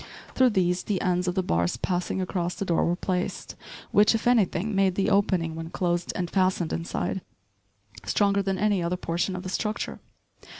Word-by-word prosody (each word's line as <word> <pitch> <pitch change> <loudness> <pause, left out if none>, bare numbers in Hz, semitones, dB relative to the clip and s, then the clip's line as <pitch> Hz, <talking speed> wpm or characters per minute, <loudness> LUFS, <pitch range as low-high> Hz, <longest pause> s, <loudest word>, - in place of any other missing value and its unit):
Through 260 -1 +4
these 180 -4 +1
the 200 -3 -1
ends 180 -1 0
of 180 - 0
the 190 - +1
bars 85 - 0
passing 180 +6 -1
across 180 -1 -2
the 200 - -3
door 170 -3 +2
were 175 - +1
placed, 180 0 -3 0.4
which, 210 +2 +5
if 220 - -2
anything, 220 -4 +2
made 195 -2 +2
the 195 +2 +1
opening, 185 -5 +2
when 165 0 -6
closed 175 0 -1
and 180 - -1
fastened 185 -2 +1
inside, 170 +3 -2 0.8
stronger 200 -1 +2
than 195 -1 -1
any 205 -1 +2
other 170 +1 -1
portion 175 +2 -2
of 185 - -5
the 185 - -5
structure. 215 +3 -3
185 Hz, 180 wpm, -26 LUFS, 175-200 Hz, 0.8 s, which